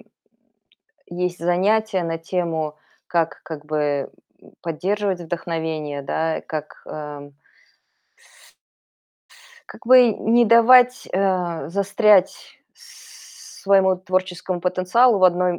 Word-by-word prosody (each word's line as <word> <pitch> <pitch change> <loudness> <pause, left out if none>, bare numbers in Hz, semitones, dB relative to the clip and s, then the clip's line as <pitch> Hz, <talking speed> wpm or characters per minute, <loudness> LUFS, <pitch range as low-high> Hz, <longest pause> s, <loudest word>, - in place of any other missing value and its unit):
э, - - -17 1.1
есть 180 0 -4
занятия 190 +3 0
на 165 0 -3
тему: 165 -3 -3 0.3
как 165 -3 -1
как 155 -2 -9
бы, 145 -2 -2 0.3
м, - - -19
поддерживать 190 +3 -2
вдохновение, 160 -3 -4
да, 160 +3 -2
как, 155 -1 -7
ам 145 -2 -9 2.3
как - - -14
бы 250 0 +7
не 235 +3 +2
давать, 245 +2 +5
э, 180 -6 -1
застрять 200 +1 +2 0.4
своему 190 -1 -2
творческому 185 -1 -3
потенциалу 185 +6 +2
в 185 - +3
одной 180 0 +3
м - - -7
180 Hz, 100 wpm, -21 LUFS, 160-195 Hz, 2.3 s, бы